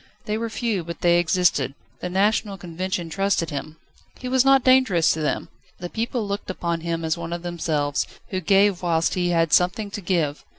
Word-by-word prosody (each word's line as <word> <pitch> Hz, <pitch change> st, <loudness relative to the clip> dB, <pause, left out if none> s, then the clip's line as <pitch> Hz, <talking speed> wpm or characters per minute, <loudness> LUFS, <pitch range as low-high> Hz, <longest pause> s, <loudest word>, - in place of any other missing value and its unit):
They 210 Hz, -, -1 dB
were 230 Hz, +1 st, -2 dB
few, 220 Hz, -4 st, -2 dB
but 170 Hz, 0 st, -8 dB
they 175 Hz, 0 st, +4 dB
existed. 175 Hz, -6 st, +1 dB, 0.2 s
The 180 Hz, -, -4 dB
National 200 Hz, +2 st, +1 dB
Convention 180 Hz, 0 st, -4 dB
trusted 195 Hz, -2 st, 0 dB
him. 155 Hz, +2 st, -6 dB, 0.4 s
"He 255 Hz, -, -7 dB
was 255 Hz, 0 st, +3 dB
not 270 Hz, -1 st, +5 dB
dangerous" 255 Hz, -11 st, +4 dB
to 160 Hz, -, -4 dB
them. 150 Hz, -, -2 dB, 0.3 s
The 175 Hz, 0 st, -7 dB
people 230 Hz, -1 st, -2 dB
looked 200 Hz, +1 st, -4 dB
upon 170 Hz, -2 st, -2 dB
him 165 Hz, 0 st, -2 dB
as 160 Hz, +1 st, -1 dB
one 170 Hz, 0 st, -5 dB
of 170 Hz, 0 st, -4 dB
themselves, 155 Hz, -4 st, -1 dB, 0.2 s
who 185 Hz, -1 st, -2 dB
gave 195 Hz, +1 st, +3 dB
whilst 165 Hz, -2 st, +1 dB
he 175 Hz, -1 st, 0 dB
had 165 Hz, -2 st, +1 dB
something 190 Hz, +4 st, +2 dB
to 205 Hz, -, -5 dB
give. 165 Hz, -5 st, -1 dB
180 Hz, 195 wpm, -23 LUFS, 165-205 Hz, 0.4 s, not